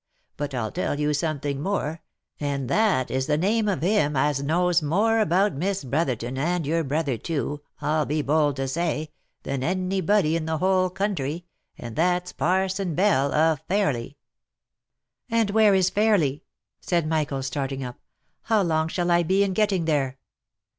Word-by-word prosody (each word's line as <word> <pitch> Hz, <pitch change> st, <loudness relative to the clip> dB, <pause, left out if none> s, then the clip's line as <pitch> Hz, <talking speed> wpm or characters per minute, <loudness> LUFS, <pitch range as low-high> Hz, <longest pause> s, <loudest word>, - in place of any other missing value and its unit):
" -, -, -44 dB
But 145 Hz, -2 st, -4 dB
I'll 110 Hz, -4 st, -2 dB
tell 145 Hz, -, -2 dB
you 150 Hz, 0 st, +1 dB
something 145 Hz, -2 st, -2 dB
more, 160 Hz, -3 st, -2 dB, 0.4 s
and 140 Hz, -3 st, -2 dB
that 205 Hz, -, +2 dB
is 130 Hz, 0 st, -1 dB
the 150 Hz, -1 st, +2 dB
name 210 Hz, +6 st, +1 dB
of 185 Hz, -8 st, -1 dB
him 175 Hz, -6 st, +2 dB
as 140 Hz, +1 st, +1 dB
knows 175 Hz, +4 st, +2 dB
more 205 Hz, +9 st, +2 dB
about 200 Hz, -1 st, +2 dB
Miss 190 Hz, +6 st, -2 dB
Brotherton 130 Hz, -3 st, -2 dB
and 170 Hz, +2 st, 0 dB
your 165 Hz, +3 st, 0 dB
brother 140 Hz, -4 st, -1 dB
too, 150 Hz, -2 st, -3 dB, 0.2 s
I'll 150 Hz, +1 st, 0 dB
be 150 Hz, +1 st, 0 dB
bold 145 Hz, -1 st, +2 dB
to 135 Hz, -1 st, -2 dB
say, 155 Hz, +1 st, -2 dB, 0.3 s
than 135 Hz, -1 st, -3 dB
any 185 Hz, +3 st, -1 dB
body 180 Hz, -4 st, +2 dB
in 165 Hz, -1 st, -2 dB
the 160 Hz, 0 st, -1 dB
whole 185 Hz, +2 st, +2 dB
country, 175 Hz, -4 st, -3 dB, 0.3 s
and 115 Hz, -2 st, -8 dB
that's 180 Hz, +2 st, 0 dB
Parson 190 Hz, 0 st, 0 dB
Bell, 140 Hz, -8 st, +2 dB
of 155 Hz, -1 st, +2 dB
Fairly." 145 Hz, -, -1 dB, 1.1 s
"And 225 Hz, -3 st, +1 dB
where 215 Hz, -2 st, +5 dB
is 185 Hz, -1 st, +2 dB
Fairly 200 Hz, -10 st, +1 dB, 0.2 s
?" -, -, -63 dB
said 170 Hz, -3 st, 0 dB
Michael, 150 Hz, -4 st, -1 dB
starting 135 Hz, 0 st, -3 dB
up. 125 Hz, -1 st, -7 dB, 0.2 s
" -, -, -48 dB
How 215 Hz, -3 st, +4 dB
long 160 Hz, -2 st, +1 dB
shall 175 Hz, +1 st, -1 dB
I 175 Hz, 0 st, +4 dB
be 190 Hz, +4 st, +2 dB
in 195 Hz, -1 st, -1 dB
getting 195 Hz, -4 st, +1 dB
there 135 Hz, -4 st, 0 dB
160 Hz, 175 wpm, -25 LUFS, 145-185 Hz, 1.1 s, where